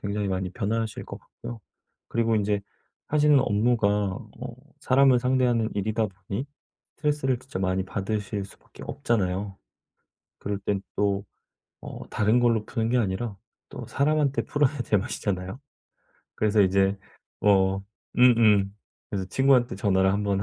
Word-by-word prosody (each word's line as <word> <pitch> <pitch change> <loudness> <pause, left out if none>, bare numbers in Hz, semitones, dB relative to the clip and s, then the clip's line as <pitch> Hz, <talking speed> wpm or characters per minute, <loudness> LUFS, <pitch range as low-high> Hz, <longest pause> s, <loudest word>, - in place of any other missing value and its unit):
굉장히 100 0 -2
많이 95 -1 -2
변하실 110 +1 -2
것 - - -8
같고요. 115 -2 -10 0.5
그리고 115 -1 +1
인제 105 0 +1 0.5
하시는 150 -1 +4
업무가 110 -1 +2
어 100 -2 -3 0.3
사람을 130 -1 +5
상대하는 125 -3 +2
일이다 110 +2 0
보니 100 +7 -6 0.5
스트레스를 145 -4 0
진짜 130 -6 -7
많이 95 0 0
받으실 100 0 -3
수밖에 - - -15
없잖아요. 100 -7 -1 0.8
그럴 100 0 -3
땐 100 -1 -1
또 100 -1 0 0.6
어 - - -8
다른 110 +3 +2
걸로 115 -3 +2
푸는 115 -2 -2
게 125 - +2
아니라 100 0 -2 0.3
또 - - -8
사람한테 145 -1 +1
풀어야 145 -1 +1
제 105 - +1
맛이잖아요. 95 0 -3 0.7
그래서 105 -1 +3
이제 95 +1 +3 0.4
뭐 95 -1 +3 0.3
음음 110 -5 +5 0.4
그래서 95 -2 -3
친구한테 130 -5 +3
전화를 95 -1 +2
1 105 +1 0
번 100 -1 0
105 Hz, 305 characters per minute, -26 LUFS, 100-120 Hz, 0.8 s, 사람을